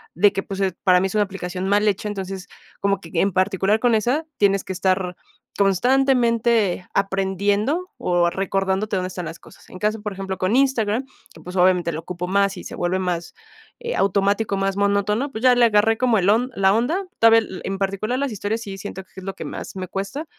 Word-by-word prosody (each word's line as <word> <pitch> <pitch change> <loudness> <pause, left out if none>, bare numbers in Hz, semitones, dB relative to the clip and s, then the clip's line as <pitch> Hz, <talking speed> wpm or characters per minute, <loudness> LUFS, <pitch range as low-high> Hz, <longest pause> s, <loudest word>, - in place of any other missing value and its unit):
de 200 +5 +5
que 195 - -2
pues, 195 0 -5 0.2
para 185 -2 +5
mí 190 - +1
es 190 - -7
una 210 - +4
aplicación 185 -1 -5
mal 205 +1 +3
hecha, 205 +1 0
entonces, 195 -1 -5 0.3
como 200 -1 +1
que 165 - -11
en 195 +4 +2
particular 190 +3 +2
con 240 0 +3
esa, 250 +9 0
tienes 195 -1 +2
que 190 - -5
estar, 185 -1 0 0.4
constantemente 230 -2 +2
aprendiendo 200 - 0
o 175 -1 +2
recordándote 195 +2 -1
dónde 185 0 -1
están 180 -1 -6
las 165 +1 -7
cosas, - - -18
en 185 - -10
caso, 210 +1 -1
por 210 0 -4
ejemplo, 190 0 -5
con 185 +3 0
Instagram, 255 -3 +1 0.3
que, - - -15
pues, 180 +3 -9
obviamente 180 -1 +3
lo 155 - -4
ocupo 180 +1 -5
más 200 +1 +1
y - - -8
se - - -7
vuelve 175 +2 -1
más, 175 -2 -3 0.5
eh, 480 0 -4
automático, 200 +1 +1
más 195 0 0
monótono, 200 +6 +1
pues 220 -1 -6
ya 250 -1 +7
le 245 - +4
agarré 220 0 +3
como 245 -2 +2
el 185 +1 +2
on 240 +5 +2
la 195 0 +3
onda. 310 - 0
Todavía 225 0 +7
el 190 -4 -8
en 195 0 -2
particular 200 +5 -1
las 280 -2 -1
historias 210 +2 -2
sí 195 -3 -7
siento 190 -1 -7
que - - -33
es 190 - -8
lo 195 +1 -4
que - - -7
más - - -7
me 185 -1 -4
cuesta, 200 - -4
200 Hz, 210 wpm, -22 LUFS, 190-220 Hz, 0.5 s, ya